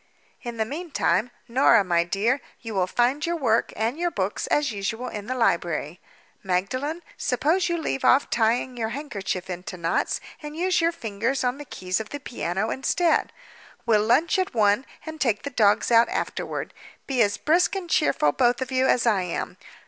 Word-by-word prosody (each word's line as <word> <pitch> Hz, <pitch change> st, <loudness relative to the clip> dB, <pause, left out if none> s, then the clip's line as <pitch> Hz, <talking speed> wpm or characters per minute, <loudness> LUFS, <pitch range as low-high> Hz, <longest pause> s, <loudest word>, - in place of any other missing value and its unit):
In 240 Hz, -2 st, -6 dB
the 220 Hz, -, 0 dB
meantime, 260 Hz, -, -1 dB, 0.2 s
Norah, 235 Hz, -3 st, +5 dB
my 170 Hz, -2 st, +2 dB
dear, 210 Hz, +10 st, 0 dB, 0.2 s
you 225 Hz, -2 st, -7 dB
will 185 Hz, -2 st, +1 dB
find 245 Hz, +8 st, +1 dB
your 340 Hz, +1 st, 0 dB
work 240 Hz, -8 st, +1 dB
and 230 Hz, +8 st, -1 dB
your 350 Hz, 0 st, +1 dB
books, 195 Hz, -, -2 dB
as 295 Hz, -3 st, +1 dB
usual, 225 Hz, +4 st, -3 dB
in 210 Hz, 0 st, -7 dB
the 255 Hz, -, -2 dB
library. 170 Hz, -, 0 dB, 0.4 s
Magdalen, 255 Hz, -, -2 dB
suppose 315 Hz, +9 st, +1 dB
you 345 Hz, -, 0 dB
leave 305 Hz, -4 st, -3 dB
off 280 Hz, -, +5 dB
tying 240 Hz, +2 st, +1 dB
your 225 Hz, -2 st, -2 dB
handkerchief 200 Hz, -9 st, -4 dB
into 180 Hz, 0 st, -6 dB
knots 165 Hz, -1 st, 0 dB, 0.2 s
and 300 Hz, 0 st, -7 dB
use 360 Hz, +1 st, +1 dB
your 335 Hz, +1 st, +3 dB
fingers 230 Hz, -1 st, -2 dB
on 250 Hz, +2 st, -1 dB
the 290 Hz, -, -7 dB
keys 185 Hz, -6 st, -3 dB
of 220 Hz, -1 st, -6 dB
the 290 Hz, -, -6 dB
piano 205 Hz, -6 st, -3 dB
instead? 330 Hz, +5 st, +1 dB, 0.5 s
We'll 220 Hz, -3 st, +4 dB
lunch 275 Hz, -, +3 dB
at 370 Hz, -8 st, -2 dB
one, 210 Hz, +4 st, +3 dB, 0.2 s
and 315 Hz, -1 st, -8 dB
take 225 Hz, -5 st, +1 dB
the 285 Hz, -, -4 dB
dogs 215 Hz, -2 st, +3 dB
out 230 Hz, 0 st, +6 dB
afterward. -, -, -3 dB, 0.3 s
Be 260 Hz, -3 st, 0 dB
as 205 Hz, -2 st, +2 dB
brisk 340 Hz, +5 st, +2 dB
and 380 Hz, -3 st, -4 dB
cheerful 300 Hz, -, +2 dB
both 245 Hz, -, +2 dB
of 260 Hz, 0 st, -4 dB
you 260 Hz, 0 st, +2 dB
as 245 Hz, -, +3 dB
I 210 Hz, -5 st, +3 dB
am. 180 Hz, -2 st, -4 dB
240 Hz, 185 wpm, -25 LUFS, 205-290 Hz, 0.5 s, out